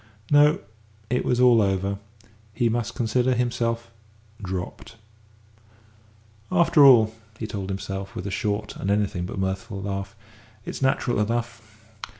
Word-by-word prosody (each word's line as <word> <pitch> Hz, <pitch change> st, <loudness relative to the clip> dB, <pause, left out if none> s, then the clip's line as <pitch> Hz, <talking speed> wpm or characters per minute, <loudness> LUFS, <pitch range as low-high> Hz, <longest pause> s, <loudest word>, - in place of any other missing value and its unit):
No, 145 Hz, +1 st, +6 dB, 0.5 s
it 125 Hz, -, +1 dB
was 125 Hz, -, +1 dB
all 125 Hz, -3 st, +6 dB
over; 100 Hz, 0 st, 0 dB, 0.6 s
he 115 Hz, +1 st, +2 dB
must 115 Hz, 0 st, -2 dB
consider 125 Hz, +1 st, +1 dB
himself 115 Hz, -1 st, -1 dB, 0.5 s
dropped. 95 Hz, +3 st, -6 dB, 1.6 s
"After 170 Hz, -4 st, +5 dB
all," 115 Hz, -5 st, +7 dB, 0.2 s
he 110 Hz, -, -4 dB
told 100 Hz, -3 st, -5 dB
himself, 95 Hz, 0 st, -5 dB
with 90 Hz, -, -5 dB
a 100 Hz, -, -3 dB
short 105 Hz, +1 st, -2 dB
and 95 Hz, -, -3 dB
anything 100 Hz, -3 st, 0 dB
but -, -, -7 dB
mirthful 95 Hz, +1 st, -3 dB
laugh, 100 Hz, +1 st, -4 dB, 0.5 s
"it's -, -, -6 dB
natural 130 Hz, -3 st, +1 dB
enough. 115 Hz, -1 st, -3 dB
110 Hz, 130 wpm, -24 LUFS, 100-120 Hz, 1.6 s, all